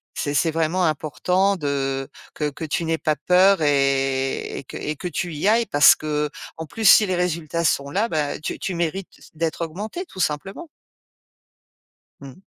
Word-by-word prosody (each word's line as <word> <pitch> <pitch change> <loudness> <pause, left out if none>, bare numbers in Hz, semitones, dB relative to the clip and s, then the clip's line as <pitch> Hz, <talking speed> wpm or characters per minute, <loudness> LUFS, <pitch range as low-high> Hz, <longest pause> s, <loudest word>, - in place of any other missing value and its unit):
c'est 145 0 -2
c'est 165 +3 +2
vraiment 165 +3 0
important 180 +6 0
de 135 -3 -2 0.3
que 150 -1 -1
que 150 - -9
tu 160 +2 -2
n'aies 165 0 0
pas 155 - 0
peur 185 +2 +4
et 135 -2 0
et - - -10
que - - -8
et 150 - -4
que 180 - -5
tu 175 0 -3
y 155 +6 -1
ailles 230 +2 +4
parce 145 0 +6
qu'en 150 +1 -4
plus 220 +5 -5
si 210 - +7
les 185 - 0
résultats 170 -2 -1
sont 140 -2 +1
là, 210 +7 +1
bah 150 -3 -2
tu 155 - -5
tu 190 - -3
mérites 175 +3 -2
c - - -17
d'être 165 +1 -2
augmentée, 210 - -6
tout 190 - -13
simplement. 190 - -3 1.5
Mmh. 135 +4 -11
160 Hz, 175 wpm, -22 LUFS, 145-185 Hz, 1.5 s, si